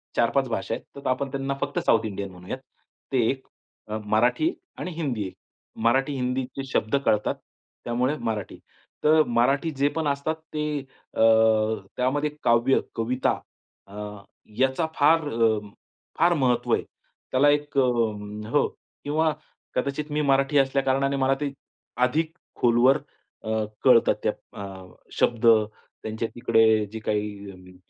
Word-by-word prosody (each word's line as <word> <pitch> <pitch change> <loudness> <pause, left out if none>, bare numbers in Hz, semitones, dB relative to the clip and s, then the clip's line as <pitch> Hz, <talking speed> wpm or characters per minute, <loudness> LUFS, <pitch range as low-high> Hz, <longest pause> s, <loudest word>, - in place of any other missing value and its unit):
4-5 120 +3 +2
भाषा 115 - -2
आहेत. - - -5
तर 140 - -6
आपण 130 +2 0
त्यांना 135 0 -2
फक्त - - -1
साउथ 115 0 +4
इंडियन 100 -2 -4
म्हणूयात. 90 +6 -7 0.5
ते 135 - +1
एक 130 -1 -3 0.6
मराठी 120 - +2 0.2
आणि 180 - -4
हिंदी 140 -10 -2
एक. - - -10 0.5
मराठी 135 +4 +3
हिंदीचे 130 +1 -2
शब्द 110 -2 0
कळतात 105 0 +2 0.5
त्यामुळे 125 +4 0
मराठी. 110 -4 -3 0.5
तर 155 +1 +6
मराठी 135 +5 +1
जे 140 +1 +3
पण 160 -2 0
असतात 140 +3 -1 0.2
ते 150 0 -1 0.5
अ, - - -1 0.8
त्यामध्ये 145 +4 +1
काव्य, 120 +3 +4 0.2
कविता 120 +3 0 0.5
अ, 100 - -13 0.6
याचा 135 +5 +2
फार 155 +2 +4
अ, 115 -3 +2 0.6
फार 175 +1 +5
महत्व 130 -6 +1
आहे. - - +2 0.5
त्याला 135 +3 +5
एक 145 0 0
अ, - - +6 0.7
हो 145 - +3 0.4
किंवा 155 +2 +1 0.4
कदाचित 140 +3 -2
मी 150 +1 0
मराठी 140 0 +2
असल्या 135 0 +3
कारणाने 135 +1 +1
मला 135 0 +2
ते 145 -1 -1 0.5
अधिक 155 +5 0 0.2
खोलवर 120 +3 +4 0.5
अ, - - -5 0.3
कळतात 125 -3 +6
त्या - - +2 0.3
अ, 95 -1 -9 0.3
शब्द 120 -1 +1 0.6
त्यांच्या 110 +1 -3
तिकडे 110 -3 +4
जे 110 - -5
काही 100 -4 -4
130 Hz, 135 wpm, -25 LUFS, 115-145 Hz, 0.8 s, तर